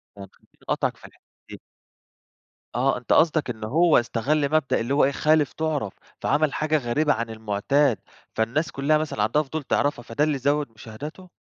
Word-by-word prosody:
خلّيني 100 -1 -10 0.4
أقاطعك - - 0
فى - - -15
الحتة - - -24 0.3
دي. - - -10 1.1
آه 130 +2 +2
أنت 125 - -1
قصدك 155 -4 +3
إن 110 -3 -5
هو 160 +9 +4
استغل 140 +5 0
مبدأ 155 -3 +2
اللي 120 +4 -2
هو 145 - +4
إيه، 140 - +1
خالف 155 0 +2
تُعرف 150 -10 -2 0.3
فعمل 150 -1 +1
حاجة 155 0 +1
غريبة 145 +3 +1
عن 115 0 -3
المعتاد، 110 +4 +1 0.4
فالناس 115 +9 0
كلّها 145 +3 +2
مثلًا 150 -9 -2
عندها 120 +8 +2
فضول 155 +2 -5
تعرفها 140 -2 0
فده 115 +6 -1
اللي 150 -2 +1
زوِد 145 +2 0
مشاهداته؟ 140 - -10
140 Hz, 170 wpm, -24 LUFS, 115-155 Hz, 1.1 s, هو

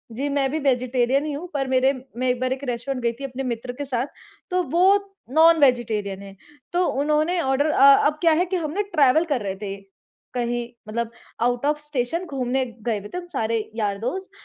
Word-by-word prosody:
जी, 275 +4 -2
मैं 280 -1 +1
भी 315 - -1
वेजिटेरियन 255 0 +1
ही 305 - -2
हूँ, 300 +5 -5
पर 275 -2 -1
मेरे 260 +1 +3 0.3
मैं 255 +1 0
एक 250 -1 0
बार 255 0 0
एक 265 +1 -8
रेस्टोरेंट 250 +1 -3
गई 235 - +2
थी 275 - -7
अपने 270 0 -4
मित्र 245 0 -3
के 285 - -2
साथ 255 0 -1 0.4
तो 365 0 +2
वो 345 +2 +3 0.5
नॉन-वेजिटेरियन 245 -11 +3
है 195 0 -11 0.4
तो 360 0 +2 0.2
उन्होंने 305 +4 +1
ऑर्डर 270 0 +1
अ, 280 -2 +7
अब 300 +1 -1
क्या 330 - +5
है 350 +4 +2
कि 370 - -3
हमने 335 +5 -2
ट्रैवल 315 -4 +3
कर 260 -5 +1
रहे 195 -2 -3
थे, 195 -1 -4 0.6
कहीं 240 -1 -1 0.2
मतलब 230 +1 -3 0.3
आउट 245 +2 +1
ऑफ़ 300 +1 +1
स्टेशन 295 +5 -2
घूमने 265 -3 -1 0.2
गए 220 -3 0
हुए 205 - -10
थे, 360 0 -4
सारे 225 -9 -1 0.2
यार-दोस्त 225 - -2
265 Hz, 195 wpm, -23 LUFS, 240-300 Hz, 0.6 s, अ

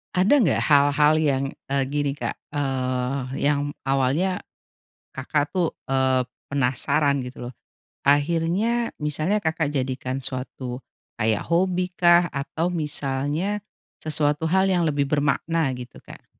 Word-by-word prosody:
Ada 210 +10 +4
nggak 200 - +2
hal-hal 145 +1 +5
yang, 140 -3 +1 0.3
eee, 140 0 +1
gini 145 +1 -2
Kak, - - -3 0.2
eee, 130 -1 -2
yang 145 0 +1 0.2
awalnya 135 +8 +1 0.7
Kakak 145 +4 -1
tuh, 175 -3 +1 0.2
eee, 130 -1 +2 0.2
penasaran 140 +1 +1
gitu 125 -1 -7
loh. - - -12 0.5
Akhirnya 170 +11 +1
misalnya 155 +7 -1
Kakak 160 -1 0
jadikan 130 0 -2
suatu 125 -1 -4 0.4
kayak 110 -2 +1
hobikah, 180 -1 +3
atau 160 +5 -2
misalnya 150 +5 -2 0.4
sesuatu 150 0 0
hal 190 +3 +3
yang 175 -3 +2
lebih 145 -1 +1
bermakna 150 +2 +1
gitu 125 -1 -10
Kak? - - -14
145 Hz, 115 wpm, -24 LUFS, 135-170 Hz, 0.7 s, hal-hal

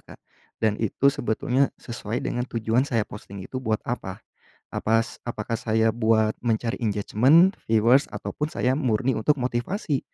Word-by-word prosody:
Kak. - - -14 0.4
Dan 110 -1 0
itu 130 +5 +2
sebetulnya 130 0 0
sesuai 115 0 -5
dengan 125 +1 -2
tujuan 115 +1 +1
saya 115 -5 +1
posting 100 -3 -10
itu 130 +4 -5
buat 110 -3 -1
apa. - - -5 0.5
Apas 115 +1 0
apakah 115 0 -3
saya 110 0 +2
buat 110 -1 +2
mencari 115 0 -1
engagement, 125 - +4
viewers, 115 +5 +4
atau - - -6
pun 150 - -2
saya 130 -5 0
murni 130 -1 +1
untuk 125 +6 +1
motivasi. 130 - -2
115 Hz, 150 wpm, -25 LUFS, 110-130 Hz, 0.5 s, engagement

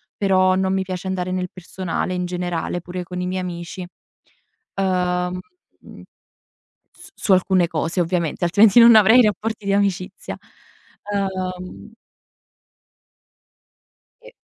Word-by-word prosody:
però 185 -2 +3
non 190 0 0
mi 190 - 0
piace 185 0 -6
andare 185 -1 -2
nel 180 -1 -2
personale 185 0 -4
in 180 0 -2
generale, 175 -1 -3
pure 180 +1 -6
con 180 +1 -7
i 180 - -2
miei 185 0 -2
amici. 175 +1 -6 0.9
Uhm 180 -1 -1 0.4
mhmm - - -14 0.9
s - - -15
su 200 - 0
alcune 185 -1 +3
cose 165 +2 -2
ovviamente, 170 -1 -1
altrimenti 205 +6 +5
non 230 -1 +8
avrei 220 +4 +7
rapporti 215 0 -2
di 195 - +1
amicizia. 195 -2 -2 0.8
Uhm 185 +1 -4 2.3
E - - -14
185 Hz, 120 wpm, -21 LUFS, 180-195 Hz, 2.3 s, non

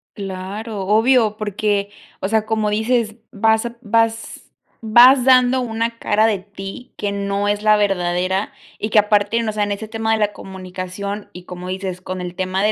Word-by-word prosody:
Claro, 200 +3 -6
obvio, 225 0 +3
porque, 205 -1 -1 0.3
o 190 - -2
sea, 220 0 +1
como 215 -1 0
dices, 220 +1 0 0.2
vas 220 +2 +2
a 235 0 -5
vas 225 0 -1 0.3
vas 245 +4 +6
dando 255 0 +5
una 230 -1 -2
cara 215 -1 +2
de 215 -3 +1
ti 195 +4 -10
que 205 -1 -3
no 200 0 -1
es 205 0 -1
la 215 0 +5
verdadera 190 -1 0 0.3
y 215 - -3
que 210 - +6
aparte, 210 +2 +2
o 215 - -1
sea, 210 0 -1
en 205 0 -1
ese 215 +2 -7
tema 225 0 -1
de 220 - +1
la 210 -1 +1
comunicación, 190 +2 -7
y 180 - -10
como 180 0 -8
dices, 185 -1 -4
con 185 0 -6
el 180 -1 -5
tema 185 +1 -1
de 210 - +3
210 Hz, 185 wpm, -20 LUFS, 195-225 Hz, 0.3 s, vas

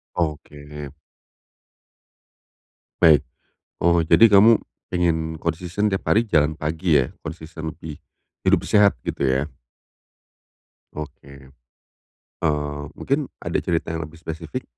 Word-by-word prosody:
Oke. 75 -3 -5 2.1
Baik. 75 -5 +6 0.6
Oh 85 0 +3
jadi 85 +7 +6
kamu 110 +3 +7 0.3
pengen 80 -3 0
konsisten 85 +6 -2
tiap 95 - -2
hari 110 +3 +4
jalan 75 -6 +2
pagi 80 +2 0
ya? 65 - -1
Konsisten 80 0 -7
lebih 80 -2 -9 0.4
hidup - - +3
sehat 105 -1 +4
gitu - - -3
ya? 65 +2 +1 1.5
Oke. 70 -2 -10 0.9
Eee, 75 -1 -1
mungkin 140 0 -1 0.2
ada - - -1
cerita 85 -2 -2
yang 80 0 -3
lebih 80 - -16
spesifik? 80 -1 -6
80 Hz, 105 wpm, -22 LUFS, 75-85 Hz, 2.1 s, kamu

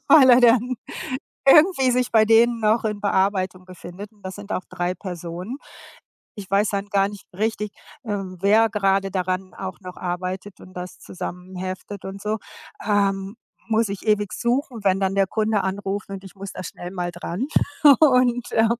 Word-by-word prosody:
weil 270 -5 +8
er 245 +1 +7
dann 245 +1 +4 0.7
irgendwie 300 -3 +6
sich 250 0 0
bei 220 -1 +6
denen 230 +1 +4
noch 220 +1 +2
in 210 -1 -2
Bearbeitung 190 -2 0
befindet. 185 +3 -10
Und 205 - -26
das 190 0 -6
sind 205 0 -7
auch 185 - -2
3 175 +1 -2
Personen. 180 - -6 0.8
Ich 195 -2 -8
weiß 200 +1 +3
dann 200 0 -2
gar 200 -1 +2
nicht 205 -2 -11
richtig, 210 0 -2 0.3
ähm, 195 -4 -4
wer 220 +3 +5
grade 195 -2 +1
daran 185 0 -2
auch 190 0 -6
noch 180 -1 -9
arbeitet 185 +2 -4
und 185 - -14
das 180 0 -7
zusammenheftet 185 +2 -7
und 195 +1 -7
so. 215 +1 -1 0.5
Ähm, 200 0 0 0.3
muss 220 0 +2
ich 200 +2 -6
ewig 210 -2 +2
suchen, 240 -1 -1
wenn 190 0 +3
dann 195 0 +1
der 195 -1 +3
Kunde 215 +1 0
anruft 195 +1 -3
und 195 0 -7
ich 195 - -12
muss 195 0 -8
da - - -7
schnell 175 +1 -7
mal 180 -2 -3
dran. 175 +7 -4 0.5
Und, 250 -5 +4
äh, 225 0 +4
200 Hz, 170 wpm, -23 LUFS, 185-220 Hz, 0.8 s, weil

